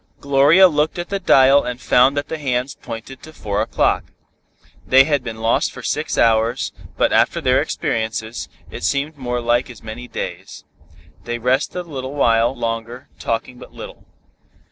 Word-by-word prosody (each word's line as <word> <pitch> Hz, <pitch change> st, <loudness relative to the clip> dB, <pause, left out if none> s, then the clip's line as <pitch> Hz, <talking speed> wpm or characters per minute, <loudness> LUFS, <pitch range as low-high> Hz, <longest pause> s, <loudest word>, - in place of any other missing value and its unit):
Gloria 140 Hz, +7 st, +5 dB
looked 150 Hz, 0 st, 0 dB
at 175 Hz, 0 st, -5 dB
the 200 Hz, -, -2 dB
dial 135 Hz, -5 st, +5 dB
and 125 Hz, 0 st, -5 dB
found 130 Hz, +3 st, +3 dB
that 145 Hz, -, -2 dB
the 160 Hz, -, -5 dB
hands 130 Hz, -2 st, -1 dB
pointed 115 Hz, +3 st, -9 dB
to 155 Hz, -, -12 dB
four 105 Hz, -8 st, -3 dB
o'clock. 110 Hz, -, 0 dB, 0.8 s
They 135 Hz, +1 st, +6 dB
had 145 Hz, -2 st, 0 dB
been 110 Hz, -2 st, -7 dB
lost 115 Hz, +1 st, +1 dB
for -, -, -11 dB
six -, -, -2 dB
hours, 115 Hz, +2 st, +2 dB, 0.3 s
but -, -, +2 dB
after -, -, +3 dB
their -, -, +2 dB
experiences, 110 Hz, 0 st, -3 dB, 0.2 s
it -, -, -8 dB
seemed 140 Hz, -, -1 dB
more 125 Hz, -3 st, -3 dB
like 120 Hz, +2 st, +1 dB
as 120 Hz, -, -12 dB
many 110 Hz, +3 st, -8 dB
days. -, -, -7 dB, 0.6 s
They 120 Hz, 0 st, -3 dB
rested 130 Hz, +8 st, 0 dB
a -, -, -8 dB
little 135 Hz, -4 st, -6 dB
while 115 Hz, -2 st, +2 dB
longer 115 Hz, +3 st, -5 dB
talking 120 Hz, +2 st, -3 dB
but -, -, -13 dB
little. -, -, -11 dB
125 Hz, 165 wpm, -20 LUFS, 115-140 Hz, 0.8 s, They